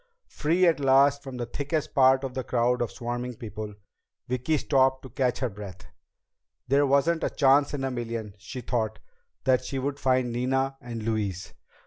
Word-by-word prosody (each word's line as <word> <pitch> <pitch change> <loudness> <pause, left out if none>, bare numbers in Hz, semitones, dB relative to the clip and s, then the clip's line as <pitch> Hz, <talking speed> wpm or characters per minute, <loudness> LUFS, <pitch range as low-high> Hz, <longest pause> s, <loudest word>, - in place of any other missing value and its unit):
Free 170 +4 +2
at 165 -3 +3
last 140 +1 +4
from 135 -2 -8
the 120 - -3
thickest 145 +5 -3
part 130 0 +5
of 130 -2 -4
the 130 -1 -3
crowd 125 0 +1
of 120 - 0
swarming 120 +1 -4
people, 110 -3 -7 0.5
Vicki 125 +5 0
stopped 130 -1 +2
to 130 - -9
catch 125 0 0
her 130 - +1
breath. 100 -3 -10 0.8
There 140 +2 +3
wasn't 150 +5 +2
a - - +1
chance 140 +1 +3
in 135 - -3
a 135 - -1
million, 115 -4 -4
she 115 +6 -7
thought, 115 -3 -2 0.5
that 130 -2 +3
she 135 - -4
would 140 +1 -2
find 130 -2 +2
Nina 135 +2 0
and 115 -2 -6
Louise. 105 -4 -2
130 Hz, 175 wpm, -27 LUFS, 120-140 Hz, 0.8 s, part